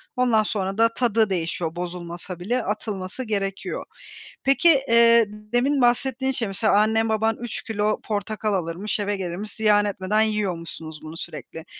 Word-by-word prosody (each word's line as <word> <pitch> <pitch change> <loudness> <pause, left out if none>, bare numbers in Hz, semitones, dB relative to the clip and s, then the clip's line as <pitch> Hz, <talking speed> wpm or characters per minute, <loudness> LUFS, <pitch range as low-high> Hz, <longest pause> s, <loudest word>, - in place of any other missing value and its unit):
Ondan 240 -4 +3
sonra 195 -2 -2
da 230 0 +5
tadı 225 -3 +2
değişiyor, 165 -2 -2
bozulmasa 175 0 -6
bile 235 +7 -1
atılması 205 +2 -4
gerekiyor. 195 -3 -3 0.6
Peki, 275 +5 +4 0.2
eee, 230 0 +6
demin 245 +7 0
bahsettiğin 260 +2 +2
şey 230 -4 -2
mesela 200 +3 +1
annen 220 +1 +2
baban 220 +1 +1
3 240 -1 -5
kilo 215 -1 -1
portakal 215 0 -2
alırmış, 185 +4 -2
eve 205 0 -1
gelirmiş, 190 +3 -4
ziyan 210 -1 +3
etmeden 205 +1 0
yiyormuşsunuz 170 -7 -3
bunu 160 +1 -8
sürekli. 160 -1 -7
210 Hz, 140 wpm, -24 LUFS, 185-225 Hz, 0.6 s, eee